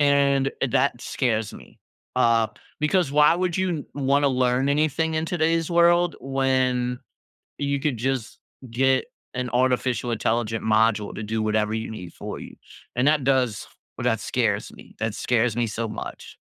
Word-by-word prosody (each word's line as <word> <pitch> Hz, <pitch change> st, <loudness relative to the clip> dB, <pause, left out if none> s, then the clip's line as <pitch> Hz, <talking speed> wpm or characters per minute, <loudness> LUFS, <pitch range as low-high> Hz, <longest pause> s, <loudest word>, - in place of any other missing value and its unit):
and 140 Hz, -1 st, +3 dB
eh, -, -, +2 dB
that 130 Hz, -2 st, +2 dB
scares 110 Hz, -6 st, -1 dB
me. -, -, -14 dB, 0.4 s
Uh, 115 Hz, -1 st, +3 dB, 0.3 s
because 150 Hz, -1 st, +1 dB
why 150 Hz, +1 st, +6 dB
would 180 Hz, -1 st, -1 dB
you 180 Hz, -6 st, -1 dB
wanna 140 Hz, +1 st, +2 dB
learn 130 Hz, +1 st, +1 dB
anything 155 Hz, +2 st, +1 dB
in 155 Hz, 0 st, 0 dB
today's 165 Hz, 0 st, 0 dB
world 175 Hz, 0 st, +4 dB
when 130 Hz, -2 st, 0 dB, 0.6 s
you 140 Hz, 0 st, 0 dB
could 135 Hz, -4 st, -1 dB
just 130 Hz, -1 st, -2 dB, 0.3 s
get 130 Hz, +2 st, +2 dB, 0.3 s
an 125 Hz, -1 st, -3 dB
artificial 125 Hz, -1 st, +1 dB
intelligent 115 Hz, 0 st, -1 dB
module 110 Hz, -1 st, +2 dB
to -, -, -5 dB
do 110 Hz, +1 st, -2 dB
whatever 110 Hz, 0 st, 0 dB
you 110 Hz, 0 st, -3 dB
need 90 Hz, -6 st, -8 dB
for -, -, -6 dB
you? -, -, -10 dB, 0.4 s
And 125 Hz, +3 st, +2 dB
that 150 Hz, -1 st, +3 dB
does 130 Hz, -6 st, +1 dB, 0.3 s
well, -, -, -4 dB
that -, -, +1 dB
scares -, -, -1 dB
me. -, -, -15 dB
That 110 Hz, -1 st, -2 dB
scares 120 Hz, -1 st, +1 dB
me 120 Hz, -, +1 dB
so 115 Hz, +1 st, -3 dB
much. -, -, -8 dB
130 Hz, 160 wpm, -24 LUFS, 115-145 Hz, 0.6 s, why